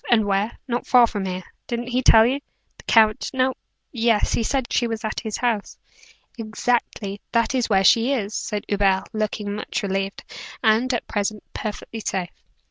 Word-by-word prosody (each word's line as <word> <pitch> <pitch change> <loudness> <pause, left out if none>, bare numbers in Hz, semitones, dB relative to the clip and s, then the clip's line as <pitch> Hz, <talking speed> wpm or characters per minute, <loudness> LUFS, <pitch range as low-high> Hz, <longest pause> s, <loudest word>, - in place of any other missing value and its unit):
"And 220 -3 +4
where?" 200 +2 0
"Not 240 -1 -2
far 245 -2 +7
from 205 -4 -4
here. 185 0 -4 0.2
Didn't 240 0 -3
he 250 +1 +1
tell 225 -3 +7
you?" 265 +4 +1 0.4
"The - - -13
count? 220 -2 +4
No 260 0 +2 0.4
yes; 230 -3 +2
he - - +1
said 260 +2 -1
she 240 - +2
was 225 -1 -4
at 215 - -2
his 220 -2 -4
house." 230 -5 -1 0.6
"Exactly. 220 -2 -2
That 230 +2 +2
is 250 -3 0
where 195 -2 +3
she 230 +5 +5
is," 215 -6 -1
said 210 -1 -3
Hubert, 195 -1 +1
looking 215 -1 -2
much 210 +2 -4
relieved. 195 0 -2 0.4
"And, 225 +3 +3
at 240 - -2
present, 205 0 -2
perfectly 220 +1 -5
safe." 185 -4 -3
220 Hz, 175 wpm, -23 LUFS, 205-240 Hz, 0.6 s, far